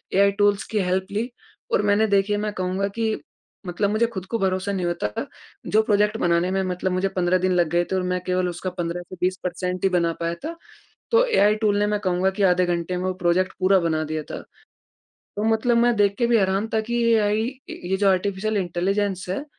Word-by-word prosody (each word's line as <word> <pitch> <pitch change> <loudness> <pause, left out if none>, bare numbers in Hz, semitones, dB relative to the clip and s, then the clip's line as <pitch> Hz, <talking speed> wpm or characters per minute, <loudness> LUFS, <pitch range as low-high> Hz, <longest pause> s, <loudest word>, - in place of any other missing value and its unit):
AI 200 +1 +5
tools 205 -1 +3
की 215 - +1
help 185 0 0
ली 220 +5 -2 0.4
और - - +3
मैंने 205 +1 +3
देखिए 200 0 +2
मैं 210 0 -2
कहूँगा 185 +1 -1
कि 220 -1 0 0.5
मतलब 185 +3 -1
मुझे 215 +3 +2
खुद 190 -6 -7
को 230 +5 -2
भरोसा 190 0 0
नहीं 190 -3 -2
होता, 175 -9 -1 0.6
जो 215 - +4
प्रोजेक्ट 210 0 +2
बनाने 175 -1 +1
में 195 0 +1
मतलब 185 0 -2
मुझे 185 +2 0
15 180 0 +2
दिन 185 +1 0
लग 175 -2 +2
गए 175 +2 +2
थे 190 - -3
और 185 - 0
मैं 180 0 -1
केवल 180 0 0
उसका 180 +2 -4
15 175 -1 -4
से - - -8
20 185 +1 +1
परसेंट 180 0 -3
ही 195 - +4
बना 170 -2 +1
पाया 170 0 -2
था। 330 +2 -4 0.6
तो 475 +2 +5
एआई 215 - +3
टूल्स 210 -2 +1
ने 205 - +2
मैं 210 0 0
कहूँगा 185 -1 +1
कि 200 +1 -2
आधे 180 -1 +4
घंटे 175 +1 -2
में 180 - -3
वो 185 - 0
प्रोजेक्ट 180 +2 +2
पूरा 190 +1 +4
बना 160 -2 0
दिया 155 0 -3
था। - - -5 1.0
तो 205 - -2
मतलब 235 +2 +2
मैं 240 0 +4
देख 200 -1 +3
के 240 - +2
भी 235 -1 +4
हैरान 195 +2 +1
था 220 - +3
कि 240 0 +1
एआई, 215 0 +2 0.3
ये 185 +2 -3
जो 200 0 +2
आर्टिफिशियल 200 +3 0
इंटेलिजेंस 190 +1 -1
है, 195 +10 -3
190 Hz, 220 wpm, -23 LUFS, 180-210 Hz, 1.0 s, एआई